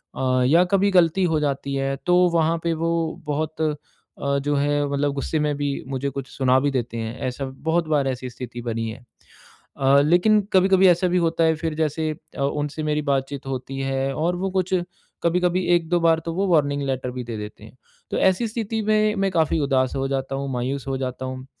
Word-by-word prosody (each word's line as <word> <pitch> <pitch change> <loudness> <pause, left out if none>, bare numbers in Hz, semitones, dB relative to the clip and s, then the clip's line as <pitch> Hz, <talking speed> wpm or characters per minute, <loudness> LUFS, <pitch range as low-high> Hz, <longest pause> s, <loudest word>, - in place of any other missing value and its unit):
अ, 130 -1 +1
या 165 +6 +5
कभी 200 +1 +3
गलती 180 0 +4
हो 155 - +2
जाती 140 -1 -2
है 135 0 -1
तो 180 0 +4 0.2
वहाँ 165 0 +2
पे 170 -1 +1
वो 165 +1 -1 0.4
बहुत 155 +2 -2
अ, 155 -1 +1 0.6
जो 145 +1 -1
है 145 +1 +1
मतलब 140 0 0
गुस्से 145 +3 -2
में 150 -1 0
भी 145 -1 -1
मुझे 135 +1 -2
कुछ 140 -1 -6
सुना 130 -1 +2
भी 145 0 +1
देते 120 -3 -2
हैं 115 +2 -4
ऐसा 135 +2 -5 0.2
बहुत 165 -1 +1
बार 145 -3 +2
ऐसी 130 -1 -3
स्थिति 120 0 -8
बनी 115 -1 -2
है। 115 +3 -9 0.7
अ, 140 +1 +5
लेकिन 180 +8 +4
कभी-कभी 190 0 +5
ऐसा 180 +1 +4
भी 180 - +2
होता 165 -1 +1
है 160 - +4
फिर 160 0 -3
जैसे 155 0 -1 0.3
अ, - - -3
उनसे 145 +2 -2
मेरी 150 0 0
बातचीत 140 -1 -2
होती 135 +1 -4
है 135 0 -1
और 170 +5 0
वो 190 +1 -2
कुछ 185 0 0 0.5
कभी-कभी 180 +1 +1
1-2 175 +1 +1
बार 165 -1 +4
तो 165 - -3
वो 195 +3 0
वार्निंग 145 -5 +2
लेटर 130 -1 -2
भी 125 0 -5
दे 115 -2 -5
देते 105 0 -8
हैं 110 - -14 0.4
तो - - -1
ऐसी 190 +5 +2
स्थिति 220 0 -3
में 215 0 +3
मैं 195 - +1
काफ़ी 160 -2 +1
उदास 135 -2 +1
हो 135 0 -1
जाता 135 0 -2
हूँ, 135 0 -3
मायूस 130 +2 -3
हो 135 - -1
जाता 130 0 -4
हूँ। 130 0 -6
145 Hz, 210 wpm, -23 LUFS, 135-170 Hz, 0.7 s, या